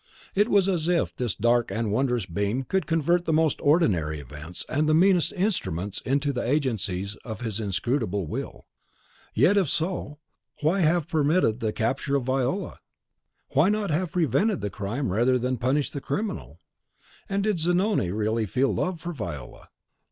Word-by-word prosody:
It 205 +4 +2
was 200 -3 +4
as 170 -4 0
if 175 -1 +1
this 120 -6 -2
dark 120 +2 +2
and 110 -2 -2
wondrous 125 -2 +1
being 100 +8 -1
could 190 +8 -1
convert 170 +2 +2
the - - 0
most 160 -1 +2
ordinary 90 - +2
events 75 +5 -8
and 150 +2 +1
the 155 - +4
meanest 180 0 +4
instruments 105 - -2
into 140 +2 0
the 125 - -2
agencies 110 -8 -1
of 110 -4 -8
his 110 -3 -2
inscrutable 100 -1 -1
will; - - -6 0.7
yet, 160 - +4
if 185 -7 +2
so, 160 -3 -2 0.4
why 160 +6 +2
have 170 -2 +2
permitted 155 -6 +2
the 110 -2 -1
capture 130 +6 -1
of 140 - +1
Viola? 135 +8 -1 0.7
Why 155 +8 +3
not 210 -3 0
have 170 +2 -1
prevented 180 - +1
the 105 - -3
crime 100 +5 -3
rather 120 +6 +3
than 125 +1 -1
punish 135 +5 0
the 140 - -5
criminal? 200 +10 -4 0.7
And 195 0 0
did 210 -4 0
Zanoni 175 - +1
really 110 +3 0
feel 130 +6 +1
love 180 -2 -1
for 175 +2 -5
Viola? 85 - -7
140 Hz, 165 wpm, -26 LUFS, 110-175 Hz, 0.7 s, was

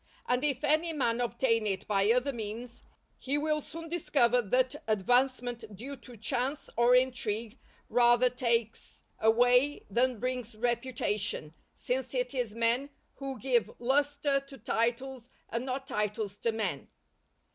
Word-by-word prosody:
And 250 +2 +1
if 285 -2 0
any 310 +3 +2
man 245 -5 0
obtain 235 -2 +1
it 195 -2 -2
by 200 0 +2
other 250 +3 +1
means, 230 +2 -6 0.4
he 275 +2 -1
will 305 0 0
soon 330 +3 -7
discover 270 -7 +2
that 255 +4 0
advancement 240 +1 +1
due 265 +8 -7
to 245 -1 -13
chance 250 +6 -2
or 240 +2 +5
intrigue 240 -2 0 0.3
rather 240 +1 +4
takes 235 -3 -1 0.2
away 245 +5 +4
than 245 +3 +2
brings 250 -2 -3
reputation, 225 -8 -1 0.2
since 255 +1 -2
it 250 0 -1
is 240 -5 -2
men 235 +4 +1 0.3
who 270 -1 -5
give 245 -3 +2
lustre 285 +2 +1
to 275 0 -13
titles 240 +2 -2 0.2
and 235 +3 -3
not 265 +1 -3
titles 210 -3 -2
to 230 - +1
men. 205 -10 -3
245 Hz, 135 wpm, -30 LUFS, 230-265 Hz, 0.4 s, or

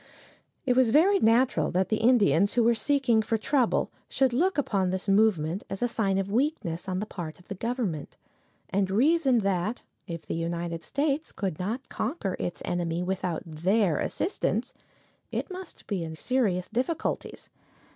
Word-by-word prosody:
It 250 -2 +2
was 255 -2 +4
very 365 - +5
natural 240 +2 +3
that 185 +1 0
the 215 - +2
Indians 210 -5 +4
who 240 - +4
were 235 +1 +5
seeking 240 -1 +2
for 225 +1 0
trouble 250 +2 +1 0.2
should 265 -2 +2
look 355 +9 +2
upon 200 -9 +1
this 190 +2 -3
movement 195 -4 +2
as 195 - -3
a - - +3
sign 200 -5 0
of 195 0 -2
weakness 215 - -1
on 185 - -1
the 210 - -2
part 170 -7 -7
of 180 - -21
the - - -2
government, 215 - -3 0.5
and 195 0 +1
reason 265 - +3
that, 195 +4 -1 0.2
if 170 -3 -6
the - - -4
United 170 0 -3
States 285 - -1
could 190 -7 -3
not 225 +8 -3
conquer 215 - -3
its 175 - -4
enemy 175 -1 -1
without 180 -3 -2
their 170 +2 +1
assistance, 385 - -1 0.6
it - - -3
must 370 -2 -9
be 195 -5 -2
in 160 -1 -6
serious 195 -3 0
difficulties. 255 +8 -3
210 Hz, 165 wpm, -27 LUFS, 180-255 Hz, 0.6 s, very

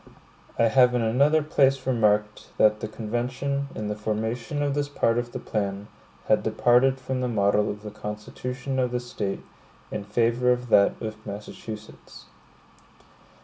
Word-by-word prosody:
(1) 115 - +3
I - - +4
have 125 +1 +5
in 120 - +1
another 140 +7 +3
place 135 -3 +2
remarked, 105 -4 +1
that 105 0 +4
the 110 - -4
convention, 125 +6 -3
in 105 - -4
the 105 - -2
formation 110 +6 -2
of 145 -1 0
this 145 0 -1
part 115 -4 +1
of 120 0 -5
their - - -5
plan, 100 -1 -3 0.4
had - - +4
departed 125 +2 +3
from 130 0 -3
the 125 - 0
model 105 -2 +2
of 105 +1 -6
the 105 - -7
constitution 125 +5 -5
of 125 -1 +1
this 125 0 -3
State, 100 -2 -3 0.5
in - - -3
favor 115 +4 +2
of 125 0 -1
that 100 -2 +4
of 110 0 -6
Massachusetts. 105 +1 -9
115 Hz, 160 wpm, -25 LUFS, 105-130 Hz, 0.5 s, have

